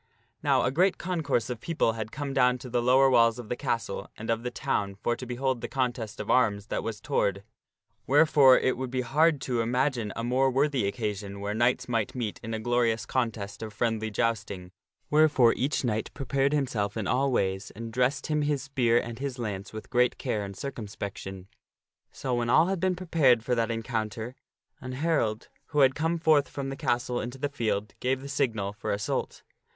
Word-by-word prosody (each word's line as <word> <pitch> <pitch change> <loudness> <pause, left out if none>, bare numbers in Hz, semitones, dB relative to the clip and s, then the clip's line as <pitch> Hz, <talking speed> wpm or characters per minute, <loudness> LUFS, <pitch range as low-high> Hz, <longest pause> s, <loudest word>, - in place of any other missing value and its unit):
Now 140 -3 +3
a - - +1
great 180 +7 +2
concourse 155 -10 -1
of 120 - -5
people 160 -9 +1
had 110 -1 -5
come 145 -2 -4
down 125 -2 +3
to 125 0 -10
the 120 0 +1
lower 130 +3 +5
walls 115 -3 +4
of 120 -3 -8
the - - -1
castle 115 -7 -3
and 115 +1 -3
of 115 0 0
the 125 - -3
town 100 -4 -2
for 120 +4 -1
to 125 - -8
behold 125 0 -1
the - - -3
contest 125 -5 -2
of 105 - -2
arms 105 -5 +2
that - - -1
was 110 -2 -4
toward, 100 -1 0 0.6
wherefore 145 -2 +6
it 130 - +1
would 130 -1 -3
be 130 0 -1
hard 150 +5 +3
to 125 -3 0
imagine 125 -2 0
a 115 - -3
more 130 +3 +2
worthy 135 -4 +1
occasion 100 -2 -4
where 100 +1 -3
knights 120 +3 +1
might 115 -2 -1
meet 115 -5 -3
in 115 -1 -4
a - - -3
glorious 115 -1 +1
contest 115 -5 -2
of 110 -1 -6
friendly 110 0 -1
jousting, 105 -5 -2 0.4
wherefore 150 -6 +5
each 135 +3 -1
knight 110 -3 -1
prepared 135 0 0
himself 120 -9 -1
in 110 - -2
all 135 +4 +1
ways, 95 -4 0
and 115 +1 -7
dressed 125 +3 +1
him 150 -1 0
his 145 -2 0
spear 125 -4 +2
and 120 -1 -3
his 135 -2 -4
lance 100 -5 -4
with 110 +3 -9
great 125 -1 +3
care 105 - -2
and 100 -1 -7
circumspection. 100 -6 -6 0.6
So 130 - -3
when 120 -1 0
all 155 +6 +6
had 190 0 -1
been 185 +1 +1
prepared 155 -10 +3
for 125 - 0
that 115 -1 +1
encounter, 115 0 -3 0.5
an 130 0 -6
herald, 130 -7 0 0.2
who 150 -2 +1
had 135 -1 +6
come 165 +4 0
forth 155 -3 +3
from 135 -1 -4
the 135 - -4
castle 120 -1 -1
into 120 +3 -6
the 145 +2 -2
field, 105 -6 -2
give 130 +1 0
the 140 - -8
signal 115 -8 -1
for 105 - -4
assault. 100 0 -2
120 Hz, 200 wpm, -28 LUFS, 110-135 Hz, 0.6 s, wherefore